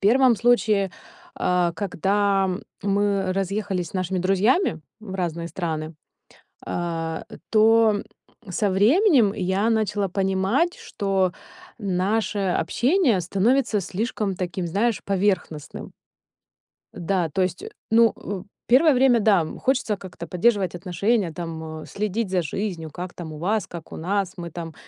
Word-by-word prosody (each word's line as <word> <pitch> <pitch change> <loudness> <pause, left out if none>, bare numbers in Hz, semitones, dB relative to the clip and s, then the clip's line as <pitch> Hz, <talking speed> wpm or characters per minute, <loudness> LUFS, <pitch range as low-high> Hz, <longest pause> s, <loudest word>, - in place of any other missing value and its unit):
1 245 +4 +5
случае, 215 -5 +2 0.4
а, 180 -1 +1
когда 195 +2 +1 0.4
мы 200 -1 +1
разъехались 195 -1 -2
с - - -18
нашими 185 0 -1
друзьями 195 - +2 0.2
в 205 -3 -7
разные 170 -2 -3
страны, 160 -2 -4 0.7
а, 165 -2 -3 0.3
то 220 -1 +4 0.5
со 200 +3 0
временем 240 - +4
я 190 +4 0
начала 210 -3 0
понимать, 195 - +1
что 195 -3 -1 0.5
наше 205 +2 0
общение 240 - +2
становится 210 +7 +1
слишком 205 +1 -2
таким, 180 -1 -3
знаешь, 205 +6 0
поверхностным. 190 -6 -2 1.0
Да, 175 -1 -1
то 185 - -1
есть, 185 - -1 0.3
ну, 230 0 +5
э, 195 -3 -6 0.2
первое 280 +6 +6
время, 250 -2 +4
да, 200 -6 +3
хочется 250 -5 0
как-то 180 -3 -9
поддерживать 190 0 +1
отношения, 185 +2 0
там, 160 -2 -6
э, - - -10
следить 210 +1 -2
за 185 -1 +1
жизнью, 165 -1 -4
как 180 +4 -6
там 160 -3 -8
у - - -8
вас, 195 +5 -1
как 170 -2 -9
у - - -7
нас. 190 +2 -1
Мы 170 -1 -6
там 165 -1 -7
195 Hz, 130 wpm, -24 LUFS, 175-215 Hz, 1.0 s, первое